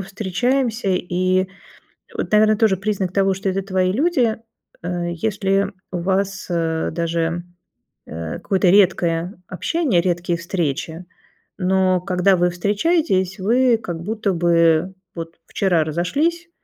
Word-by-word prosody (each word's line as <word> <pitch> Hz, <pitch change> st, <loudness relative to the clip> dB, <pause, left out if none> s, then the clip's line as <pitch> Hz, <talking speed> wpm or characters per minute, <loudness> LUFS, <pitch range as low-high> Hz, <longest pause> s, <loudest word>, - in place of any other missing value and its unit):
встречаемся, 220 Hz, +5 st, -1 dB
и 185 Hz, 0 st, +1 dB, 0.7 s
вот, -, -, -3 dB
наверное, 215 Hz, 0 st, +5 dB
тоже 215 Hz, -3 st, +3 dB
признак 190 Hz, -2 st, -2 dB
того, 195 Hz, 0 st, +2 dB
что 195 Hz, +1 st, -3 dB
это 195 Hz, +1 st, -1 dB
твои 185 Hz, -1 st, 0 dB
люди, 255 Hz, -, +1 dB, 0.5 s
э, 175 Hz, 0 st, -3 dB
если 195 Hz, +1 st, 0 dB, 0.2 s
у 180 Hz, -, -2 dB
вас, 190 Hz, +1 st, -1 dB
э, 165 Hz, -2 st, -1 dB
даже, 170 Hz, +1 st, -1 dB, 0.6 s
э, 80 Hz, 0 st, -6 dB
какое-то 190 Hz, -2 st, +1 dB
редкое 180 Hz, -2 st, +3 dB
общение, 235 Hz, -, 0 dB
редкие 175 Hz, -1 st, -1 dB
встречи, 170 Hz, -1 st, -3 dB, 0.5 s
но 185 Hz, -1 st, +2 dB
когда 185 Hz, 0 st, +2 dB
вы 175 Hz, 0 st, +2 dB
встречаетесь, 200 Hz, -, 0 dB
вы 240 Hz, +4 st, +3 dB
как 175 Hz, -6 st, -6 dB
будто 210 Hz, 0 st, -1 dB
бы 170 Hz, +1 st, +3 dB, 0.2 s
вот 165 Hz, 0 st, -7 dB
вчера 175 Hz, -5 st, +1 dB
разошлись, 290 Hz, -, -1 dB
185 Hz, 125 wpm, -20 LUFS, 175-205 Hz, 0.7 s, наверное